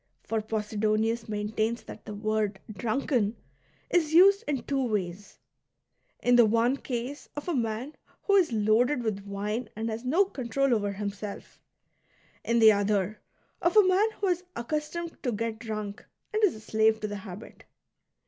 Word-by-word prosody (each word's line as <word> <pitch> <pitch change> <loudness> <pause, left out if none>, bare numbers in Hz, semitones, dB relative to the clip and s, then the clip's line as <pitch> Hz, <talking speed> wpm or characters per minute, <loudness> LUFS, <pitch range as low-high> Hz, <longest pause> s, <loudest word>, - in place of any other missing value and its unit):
For 225 -1 -1
Posidonius 215 +1 -1
maintains 215 +2 -1
that - - -11
the 210 - -6
word 215 -1 -1
"drunken" 230 +1 0 0.6
is 320 -3 +2
used 395 +4 +7
in 275 -4 -1
two 275 -1 0
ways, 205 -4 -3 0.4
— - - -46
in 245 0 +5
the 240 - +8
one 230 +4 +2
case 255 +2 -5
of 295 - -6
a 350 - 0
man 235 +2 -2 0.3
who 400 - +3
is 365 -8 +4
loaded 230 +5 +2
with 200 -3 -3
wine 210 +4 -3
and 225 +1 -3
has 220 +2 -5
no 325 +11 +3
control 275 -4 0
over 205 -3 0
himself; 200 0 -6 0.8
in 235 - +1
the 220 -1 +8
other, 205 0 0 0.4
of 345 +5 +2
a 415 -3 +7
man 390 +4 +4
who 405 - -2
is 355 0 0
accustomed 305 +7 -4
to 250 - -1
get 225 0 -3
drunk, 215 -3 -5 0.3
and 430 0 0
is 385 - +4
a - - -9
slave 220 0 +2
to 215 - -1
the 205 0 -5
habit. 195 +2 -10
225 Hz, 165 wpm, -28 LUFS, 210-275 Hz, 0.8 s, the